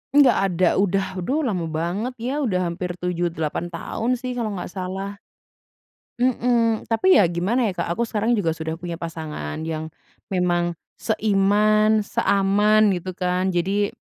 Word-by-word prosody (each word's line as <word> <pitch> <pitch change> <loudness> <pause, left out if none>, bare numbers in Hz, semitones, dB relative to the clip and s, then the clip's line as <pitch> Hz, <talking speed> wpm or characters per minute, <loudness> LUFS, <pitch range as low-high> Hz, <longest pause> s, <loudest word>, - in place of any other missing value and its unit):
Nggak 275 -5 +6
ada 180 -1 +2
udah, 195 0 +2
duh 275 - -1
lama 185 - -1
banget 175 +10 -2
ya, 250 +5 -3
udah 185 -10 0
hampir 180 +1 -4
7, 175 -1 -1
8 160 0 -3
tahun 220 +8 -2
sih 255 +1 -5
kalau 230 -4 -3
nggak 180 - -6
salah. 195 +1 -5 1.0
Mhm, 240 -3 +1
Tapi 370 +12 +4
ya 175 - +3
gimana 205 +8 +1
ya - - -2
Kak, 170 - -1
aku 205 - -3
sekarang 220 +2 +1
juga 205 -8 +1
sudah 160 0 -3
punya 170 0 -6
pasangan 160 - -5
yang 160 -1 -3 0.5
memang 175 -1 +1 0.2
seiman, 215 0 +3
seaman, 205 +2 +3
gitu 185 -1 -2
kan. 180 +1 0
Jadi, 195 +4 0
195 Hz, 150 wpm, -23 LUFS, 175-220 Hz, 1.0 s, Nggak